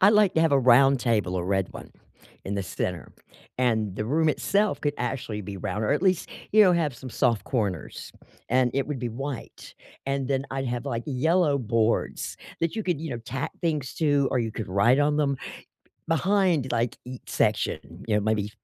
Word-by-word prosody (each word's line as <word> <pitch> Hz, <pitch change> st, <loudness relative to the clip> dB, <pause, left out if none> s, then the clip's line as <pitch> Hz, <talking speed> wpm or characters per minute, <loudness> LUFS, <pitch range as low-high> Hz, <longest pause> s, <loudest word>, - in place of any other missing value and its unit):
I'd 195 Hz, +2 st, +7 dB
like 210 Hz, -3 st, +4 dB
to 160 Hz, -, +3 dB
have 165 Hz, -3 st, +3 dB
a 140 Hz, -, +5 dB
round 130 Hz, +1 st, +5 dB
table- 105 Hz, -7 st, +1 dB
a 85 Hz, -, -2 dB
red 95 Hz, -1 st, 0 dB
one- -, -, -10 dB, 0.5 s
in 100 Hz, +1 st, -3 dB
the 100 Hz, -, -1 dB
center, 90 Hz, -4 st, -4 dB, 0.4 s
and 110 Hz, -6 st, +1 dB
the 105 Hz, -, -3 dB
room 155 Hz, +6 st, +2 dB
itself 200 Hz, +6 st, +1 dB
could 145 Hz, -1 st, 0 dB
actually 120 Hz, -4 st, -3 dB
be 100 Hz, 0 st, -7 dB
round 105 Hz, +3 st, -3 dB
or -, -, +2 dB
at 150 Hz, -, 0 dB
least, 185 Hz, -3 st, +2 dB, 0.2 s
you 215 Hz, -, +5 dB
know, 185 Hz, -3 st, +6 dB
have 160 Hz, -5 st, +1 dB
some 130 Hz, +2 st, -9 dB
soft 115 Hz, -5 st, +1 dB
corners, 100 Hz, -, -3 dB, 0.4 s
and 125 Hz, 0 st, +3 dB
it 135 Hz, -, 0 dB
would 145 Hz, -3 st, -3 dB
be 120 Hz, -1 st, -2 dB
white, 135 Hz, +3 st, -7 dB, 0.3 s
and 135 Hz, -1 st, -1 dB
then 135 Hz, 0 st, 0 dB
I'd 135 Hz, 0 st, -2 dB
have, 120 Hz, +2 st, -3 dB
like, 120 Hz, -4 st, -3 dB
yellow 150 Hz, +2 st, +2 dB
boards 115 Hz, -2 st, 0 dB, 0.2 s
that 165 Hz, +3 st, 0 dB
you 220 Hz, -, -2 dB
could, 175 Hz, -6 st, -1 dB
you 160 Hz, -2 st, -5 dB
know, 120 Hz, -, -3 dB
tack 135 Hz, +5 st, -4 dB
things 150 Hz, -6 st, -1 dB
to 145 Hz, -3 st, +2 dB
or 125 Hz, -, +2 dB
you 115 Hz, -, -2 dB
could 110 Hz, 0 st, -5 dB
write 100 Hz, +8 st, +4 dB
on 145 Hz, 0 st, +2 dB
them 140 Hz, -2 st, +1 dB, 0.7 s
behind, 170 Hz, -5 st, +2 dB
like, 115 Hz, 0 st, 0 dB
each 125 Hz, 0 st, -10 dB
section, 85 Hz, +3 st, -1 dB
you 105 Hz, -, +2 dB
know, 105 Hz, -, +2 dB
maybe, 105 Hz, -1 st, 0 dB
130 Hz, 205 wpm, -26 LUFS, 110-150 Hz, 0.7 s, I'd